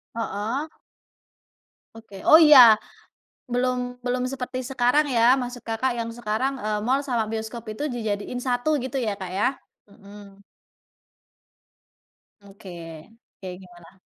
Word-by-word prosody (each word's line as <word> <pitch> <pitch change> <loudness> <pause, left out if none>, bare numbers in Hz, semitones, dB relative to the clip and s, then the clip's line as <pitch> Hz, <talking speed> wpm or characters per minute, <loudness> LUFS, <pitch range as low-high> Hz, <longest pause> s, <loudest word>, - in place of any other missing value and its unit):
Heeh. 230 +6 -3 1.3
Oke, 220 -3 -12
oh, 315 - +9
iya. 260 -8 +9 0.7
Belum 250 0 -1
belum 250 0 -1
seperti 255 -1 -5
sekarang 260 +3 +1
ya, 240 -1 +4
maksud 245 -1 -6
Kakak 240 +2 -1
yang 230 0 -3
sekarang, 240 +3 -2
eee, 210 -1 -2
mall 265 +3 +1
sama 245 -6 -1
bioskop 225 +1 -5
itu 215 - -6
dijadiin 220 -1 -4
satu 255 +4 0
gitu 260 +1 -4
ya, 220 -5 -1
Kak, 190 -2 -7
ya. 195 +2 +1 0.4
Mhm. 200 -1 -15 2.0
Oke, 200 -1 -14 0.7
kayak 185 -2 -8
gimana? 175 +1 -17
235 Hz, 120 wpm, -24 LUFS, 210-255 Hz, 2.0 s, oh